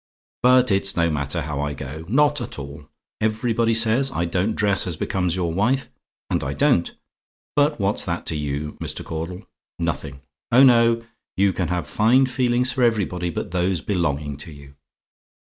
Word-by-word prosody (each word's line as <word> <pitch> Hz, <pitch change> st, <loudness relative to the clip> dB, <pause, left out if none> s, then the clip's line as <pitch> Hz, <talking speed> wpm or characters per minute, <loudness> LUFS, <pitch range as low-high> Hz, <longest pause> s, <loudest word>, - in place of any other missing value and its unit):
But 125 Hz, -1 st, +5 dB
it's 100 Hz, 0 st, +1 dB
no 85 Hz, -1 st, +2 dB
matter 75 Hz, +2 st, -2 dB
how 70 Hz, -1 st, -3 dB
I 75 Hz, 0 st, -2 dB
go, 75 Hz, +4 st, -7 dB
not 145 Hz, +5 st, +2 dB
at -, -, -4 dB
all. 70 Hz, +1 st, -9 dB, 0.3 s
Everybody 115 Hz, +1 st, +1 dB
says 115 Hz, +4 st, +2 dB
I 85 Hz, -, -1 dB
don't 95 Hz, +5 st, -1 dB
dress 100 Hz, -2 st, +1 dB
as 85 Hz, -, -2 dB
becomes 90 Hz, -1 st, -1 dB
your 85 Hz, -3 st, -1 dB
wife 125 Hz, +9 st, +1 dB, 0.4 s
and -, -, 0 dB
I -, -, -2 dB
don't; -, -, +2 dB, 0.6 s
but 150 Hz, -1 st, +2 dB
what's 100 Hz, +1 st, 0 dB
that 85 Hz, -1 st, -3 dB
to 80 Hz, -, -2 dB
you, 75 Hz, 0 st, -4 dB
Mr. -, -, -3 dB
Caudle? 85 Hz, +3 st, -5 dB, 0.3 s
Nothing. 70 Hz, -4 st, -3 dB, 0.3 s
Oh, 125 Hz, +3 st, +7 dB
no! 115 Hz, -2 st, +5 dB, 0.3 s
you 100 Hz, 0 st, +3 dB
can 90 Hz, -2 st, -1 dB
have 90 Hz, -2 st, -2 dB
fine 115 Hz, -, +3 dB
feelings 125 Hz, 0 st, +1 dB
for 130 Hz, -, -2 dB
everybody 100 Hz, -7 st, +1 dB
but 85 Hz, -, -5 dB
those 90 Hz, -1 st, 0 dB
belonging 75 Hz, -7 st, -1 dB
to 80 Hz, -, -10 dB
you. 70 Hz, -1 st, -13 dB
95 Hz, 170 wpm, -22 LUFS, 80-115 Hz, 0.6 s, Oh